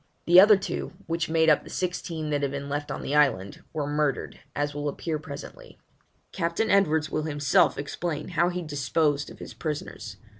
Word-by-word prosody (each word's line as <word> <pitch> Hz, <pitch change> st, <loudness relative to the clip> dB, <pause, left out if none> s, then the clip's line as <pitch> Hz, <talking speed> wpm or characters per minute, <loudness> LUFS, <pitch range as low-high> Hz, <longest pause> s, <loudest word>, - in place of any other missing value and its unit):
The 175 Hz, +2 st, +8 dB
other 205 Hz, +1 st, +8 dB
two, 190 Hz, -, -4 dB
which 165 Hz, 0 st, -2 dB
made 160 Hz, 0 st, +3 dB
up 155 Hz, -2 st, +5 dB
the -, -, -12 dB
sixteen 170 Hz, -4 st, -3 dB
that 145 Hz, -1 st, 0 dB
had 140 Hz, -, 0 dB
been 140 Hz, +1 st, -5 dB
left 145 Hz, +1 st, -3 dB
on -, -, -4 dB
the 140 Hz, -, -3 dB
island, 130 Hz, -10 st, +2 dB
were 150 Hz, -2 st, -2 dB
murdered, 145 Hz, -1 st, -1 dB, 0.2 s
as 145 Hz, 0 st, -1 dB
will 145 Hz, 0 st, -2 dB
appear 155 Hz, +2 st, -3 dB
presently. 155 Hz, -, -10 dB, 0.5 s
Captain 170 Hz, +4 st, 0 dB
Edwards 160 Hz, -6 st, +3 dB
will 155 Hz, -, 0 dB
himself 145 Hz, -3 st, +3 dB
explain 150 Hz, +2 st, -4 dB
how 175 Hz, 0 st, +2 dB
he 180 Hz, 0 st, -3 dB
disposed 145 Hz, 0 st, 0 dB
of -, -, -12 dB
his -, -, -9 dB
prisoners. 145 Hz, -, -5 dB
150 Hz, 185 wpm, -26 LUFS, 145-170 Hz, 0.5 s, The